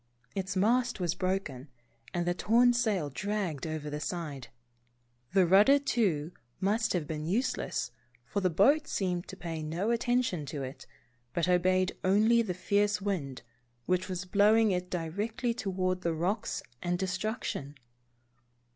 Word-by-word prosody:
Its 190 Hz, -1 st, -3 dB
mast 235 Hz, +4 st, +2 dB
was 175 Hz, -2 st, 0 dB
broken, 180 Hz, -8 st, -2 dB, 0.4 s
and 175 Hz, -1 st, -1 dB
the 175 Hz, -, +1 dB
torn 240 Hz, +6 st, +4 dB
sail 210 Hz, -11 st, 0 dB
dragged 185 Hz, -3 st, -2 dB
over 155 Hz, -1 st, -4 dB
the 150 Hz, 0 st, -4 dB
side. 150 Hz, -5 st, -4 dB, 0.9 s
The 190 Hz, -2 st, +5 dB
rud 190 Hz, +4 st, +6 dB
der, 280 Hz, +1 st, +7 dB
too, 200 Hz, -, 0 dB, 0.3 s
must 215 Hz, +3 st, +1 dB
have 175 Hz, -4 st, -1 dB
been 155 Hz, 0 st, -4 dB
useless, 240 Hz, +9 st, -1 dB, 0.3 s
for 200 Hz, -, -2 dB
the 185 Hz, -, +2 dB
boat 270 Hz, -, +4 dB
seemed 180 Hz, -3 st, -2 dB
to -, -, -9 dB
pay 165 Hz, -2 st, -5 dB
no 170 Hz, +8 st, -1 dB
attention 235 Hz, -, 0 dB
to 140 Hz, 0 st, -4 dB
it, 130 Hz, +1 st, -8 dB, 0.5 s
but 170 Hz, 0 st, +1 dB
obeyed 185 Hz, +1 st, +2 dB
only 215 Hz, +5 st, +4 dB
the 190 Hz, -6 st, -3 dB
fierce 205 Hz, +3 st, +1 dB
wind, 175 Hz, -10 st, -3 dB, 0.4 s
which 185 Hz, +1 st, 0 dB
was 185 Hz, 0 st, -3 dB
blowing 210 Hz, +3 st, +4 dB
it 180 Hz, 0 st, -2 dB
directly 210 Hz, +9 st, -2 dB
toward 185 Hz, -4 st, -1 dB
the 170 Hz, -2 st, -1 dB
rocks 190 Hz, +7 st, -1 dB, 0.2 s
and 175 Hz, 0 st, 0 dB
destruction 185 Hz, -, -3 dB
185 Hz, 145 wpm, -30 LUFS, 170-210 Hz, 0.9 s, der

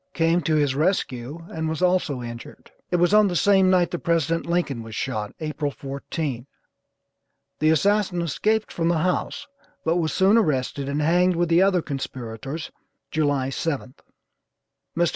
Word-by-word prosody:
came 165 Hz, +1 st, +2 dB
to 155 Hz, 0 st, +1 dB
his 145 Hz, -3 st, +2 dB
rescue 150 Hz, -2 st, -1 dB
and 160 Hz, 0 st, -2 dB
was 160 Hz, -, -3 dB
also 180 Hz, -8 st, +1 dB
injured. 120 Hz, 0 st, -9 dB, 0.2 s
It -, -, 0 dB
was 175 Hz, +2 st, +3 dB
on 210 Hz, -1 st, +6 dB
the 180 Hz, -, -2 dB
same 190 Hz, +2 st, +4 dB
night 180 Hz, -2 st, +3 dB
that 175 Hz, -, -3 dB
President 165 Hz, 0 st, 0 dB
Lincoln 170 Hz, -8 st, -1 dB
was 110 Hz, -1 st, -9 dB
shot, 110 Hz, -6 st, -3 dB
April 150 Hz, -1 st, -2 dB
14. 140 Hz, -1 st, -5 dB, 1.1 s
The 155 Hz, -, +3 dB
assassin 195 Hz, +3 st, +2 dB
escaped 215 Hz, +7 st, 0 dB
from 165 Hz, -1 st, -1 dB
the 170 Hz, -1 st, +2 dB
house, 185 Hz, +9 st, -1 dB, 0.4 s
but 165 Hz, +2 st, +2 dB
was 160 Hz, -3 st, 0 dB
soon 195 Hz, +8 st, +4 dB
arrested 140 Hz, -, -1 dB
and 145 Hz, +2 st, -1 dB
hanged 175 Hz, +3 st, +3 dB
with 170 Hz, 0 st, 0 dB
the 170 Hz, +2 st, +5 dB
other 190 Hz, -3 st, +3 dB
conspirators, 135 Hz, +1 st, -6 dB, 0.4 s
July 145 Hz, -4 st, 0 dB
7. 135 Hz, -3 st, -3 dB, 1.0 s
Mr. 170 Hz, -1 st, +3 dB
160 Hz, 160 wpm, -24 LUFS, 140-175 Hz, 1.1 s, on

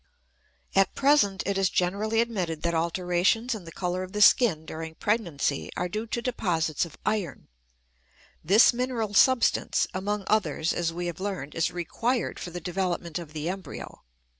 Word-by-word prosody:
At 195 Hz, -1 st, +3 dB
present 270 Hz, -9 st, +3 dB
it 195 Hz, 0 st, 0 dB
is 190 Hz, -1 st, +3 dB
generally 205 Hz, +6 st, +1 dB
admitted 185 Hz, -9 st, -3 dB
that 170 Hz, 0 st, 0 dB
alterations 180 Hz, +8 st, +1 dB
in 210 Hz, -6 st, -7 dB
the 165 Hz, -, -9 dB
color 180 Hz, +1 st, -2 dB
of 185 Hz, +1 st, -7 dB
the 210 Hz, -, -1 dB
skin 185 Hz, -10 st, +5 dB
during 160 Hz, 0 st, -7 dB
pregnancy 170 Hz, -10 st, -1 dB
are 180 Hz, -, -1 dB
due 215 Hz, +5 st, -4 dB
to 235 Hz, +1 st, -3 dB
deposits 175 Hz, -, 0 dB
of 165 Hz, -, -13 dB
iron. 190 Hz, -, -2 dB, 0.9 s
This 205 Hz, +9 st, +6 dB
mineral 240 Hz, -4 st, -2 dB
substance, 260 Hz, +3 st, +3 dB
among 205 Hz, +2 st, -2 dB
others, 200 Hz, -6 st, +1 dB
as 170 Hz, -1 st, -1 dB
we 175 Hz, +1 st, -4 dB
have 175 Hz, -1 st, -4 dB
learned, 190 Hz, -7 st, -4 dB
is 165 Hz, -, +1 dB
required 230 Hz, +8 st, -2 dB
for -, -, -6 dB
the 175 Hz, +1 st, -6 dB
development 175 Hz, -1 st, -2 dB
of 160 Hz, -3 st, -10 dB
the 155 Hz, 0 st, -4 dB
embryo. 185 Hz, -4 st, -6 dB
185 Hz, 165 wpm, -27 LUFS, 170-215 Hz, 0.9 s, This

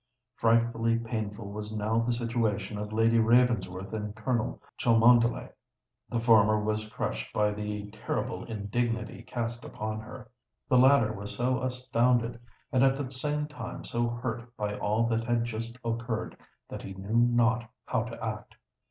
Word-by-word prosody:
Frightfully 115 Hz, 0 st, +2 dB
painful 110 Hz, -3 st, -4 dB
was 105 Hz, +1 st, -5 dB
now 110 Hz, +2 st, +1 dB
the 115 Hz, +1 st, +1 dB
situation 115 Hz, -4 st, -1 dB
of 105 Hz, 0 st, -5 dB
Lady 115 Hz, +1 st, +3 dB
Ravensworth 115 Hz, -5 st, +2 dB
and 105 Hz, -1 st, -4 dB
Colonel 115 Hz, +1 st, -1 dB, 0.2 s
Cholmondeley. 115 Hz, +1 st, +4 dB, 0.6 s
The 120 Hz, -, -1 dB
former 110 Hz, -2 st, +5 dB
was 110 Hz, 0 st, -2 dB
crushed -, -, -3 dB
by 105 Hz, -1 st, +2 dB
the 105 Hz, 0 st, -4 dB
terrible 110 Hz, -, -3 dB
indignity 115 Hz, +1 st, -2 dB
cast 120 Hz, 0 st, -4 dB
upon 110 Hz, 0 st, -4 dB
her: 120 Hz, +2 st, -10 dB, 0.4 s
the 125 Hz, -, +5 dB
latter 130 Hz, -4 st, +5 dB
was 100 Hz, 0 st, -6 dB
so 125 Hz, +1 st, +1 dB
astounded 125 Hz, -2 st, +1 dB, 0.3 s
and 130 Hz, -2 st, +4 dB
at 135 Hz, 0 st, +4 dB
the 135 Hz, -2 st, -4 dB
same 150 Hz, +3 st, -1 dB
time 150 Hz, -, -7 dB
so 120 Hz, 0 st, -1 dB
hurt 120 Hz, 0 st, -5 dB
by 105 Hz, -1 st, -2 dB
all 105 Hz, +3 st, +1 dB
that 115 Hz, 0 st, 0 dB
had 120 Hz, -1 st, +1 dB
just 115 Hz, +1 st, -5 dB
occurred, 115 Hz, 0 st, -2 dB, 0.3 s
that -, -, -7 dB
he 95 Hz, -, -7 dB
knew 100 Hz, +4 st, -2 dB
not 120 Hz, -1 st, +2 dB, 0.2 s
how 125 Hz, -, 0 dB
to 115 Hz, -1 st, -6 dB
act. 105 Hz, -1 st, -5 dB
115 Hz, 150 wpm, -29 LUFS, 105-120 Hz, 0.6 s, former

